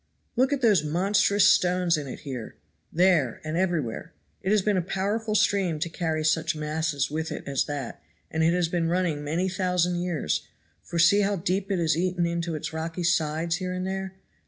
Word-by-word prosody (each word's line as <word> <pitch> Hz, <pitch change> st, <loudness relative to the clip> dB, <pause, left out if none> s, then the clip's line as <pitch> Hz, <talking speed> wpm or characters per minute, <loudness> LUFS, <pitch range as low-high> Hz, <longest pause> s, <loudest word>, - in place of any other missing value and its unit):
"Look 260 Hz, +3 st, +2 dB
at 280 Hz, -1 st, 0 dB
those 205 Hz, -9 st, +4 dB
monstrous 195 Hz, +5 st, +2 dB
stones 180 Hz, -2 st, +3 dB
in 150 Hz, -2 st, -4 dB
it 130 Hz, -, -8 dB
here, 130 Hz, -6 st, -6 dB, 0.4 s
there 165 Hz, -8 st, +2 dB
and 155 Hz, +1 st, -3 dB
everywhere. 170 Hz, -10 st, -1 dB, 0.3 s
It 190 Hz, -, -2 dB
has 210 Hz, -1 st, +3 dB
been 210 Hz, 0 st, +2 dB
a 185 Hz, -, +2 dB
powerful 205 Hz, +5 st, -2 dB
stream 195 Hz, -6 st, +2 dB
to 170 Hz, +3 st, -2 dB
carry 160 Hz, -2 st, -2 dB
such 155 Hz, 0 st, +1 dB
masses 150 Hz, -2 st, -1 dB
with 160 Hz, +1 st, -3 dB
it -, -, -6 dB
as 135 Hz, -2 st, 0 dB
that, 145 Hz, -5 st, -5 dB, 0.3 s
and 160 Hz, -, -1 dB
it 165 Hz, -, +4 dB
has 175 Hz, -1 st, +1 dB
been 165 Hz, -1 st, -1 dB
running 170 Hz, -4 st, 0 dB
many 165 Hz, +6 st, -1 dB
thousand 180 Hz, -1 st, 0 dB
years, 170 Hz, -, -1 dB, 0.4 s
for 170 Hz, -, -6 dB
see 170 Hz, +5 st, +5 dB
how 205 Hz, 0 st, +1 dB
deep 190 Hz, +2 st, -1 dB
it 195 Hz, -, +1 dB
has 165 Hz, -2 st, +2 dB
eaten 180 Hz, +1 st, 0 dB
into 170 Hz, -1 st, -2 dB
its 155 Hz, -, -5 dB
rocky 165 Hz, +2 st, -4 dB
sides 165 Hz, -1 st, +1 dB
here 185 Hz, -1 st, -3 dB
and 185 Hz, 0 st, -3 dB
there. 190 Hz, 0 st, -4 dB
170 Hz, 195 wpm, -26 LUFS, 155-190 Hz, 0.4 s, see